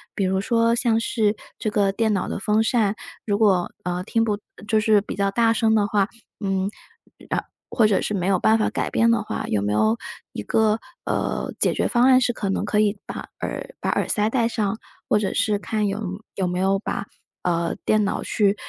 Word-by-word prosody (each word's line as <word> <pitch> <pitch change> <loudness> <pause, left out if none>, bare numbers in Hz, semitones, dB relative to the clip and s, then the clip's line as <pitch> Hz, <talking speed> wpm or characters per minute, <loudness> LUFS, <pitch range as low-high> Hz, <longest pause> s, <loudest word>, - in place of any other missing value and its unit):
比 200 - 0
如 190 +1 +1
说 230 +2 +2
像 235 -2 +2
是 215 -2 +1 0.2
这 215 - -1
个 205 -2 +2
电 220 +2 +1
脑 195 - -1
的 - - -3
风 210 +2 +2
扇， 220 -3 +2 0.3
如 205 -2 +1
果， 195 -5 +3
呃， 180 0 -2
听 225 +2 +1
不 210 -2 0 0.3
就 220 0 +3
是 215 -1 +4
比 205 - -6
较 200 0 +1
大 225 +3 +3
声 220 -1 +2
的 210 -2 +3
话， 205 -2 +1 0.3
嗯 195 -1 -1 0.6
呃， - - 0 0.3
或 225 - +3
者 205 -3 +3
是 - - -2
没 180 -2 -1
有 190 -1 +2
办 220 +4 +4
法 215 - +1
改 - - -1
变 230 +1 +3
的 230 -2 +2
话， 215 - -4
有 100 - +1
没 105 0 -1
有 110 +2 +3 0.4
一 - - -4
个， 215 - +2 0.3
呃， - - -2
解 - - +2
决 - - +1
方 245 -1 +3
案 260 -1 +7
是 240 -1 +1
可 200 -3 -3
能 195 - -1
可 210 0 +1
以 210 -1 +2
把 - - -6
耳 - - -5
把 - - -2
耳 - - 0
塞 210 -1 +1
戴 235 -2 +2
上， 215 -2 -1 0.3
或 210 - +3
者 200 - -1
是 210 -2 +1
看 215 -1 -1
有 200 +2 -2 0.3
有 190 -2 0
没 180 +1 -2
有 195 +1 +2
把， 200 - -3 0.4
呃， 170 -1 0
电 215 -1 +3
脑 200 - -2
去 205 -2 +2
210 Hz, 235 characters per minute, -23 LUFS, 195-225 Hz, 0.6 s, 案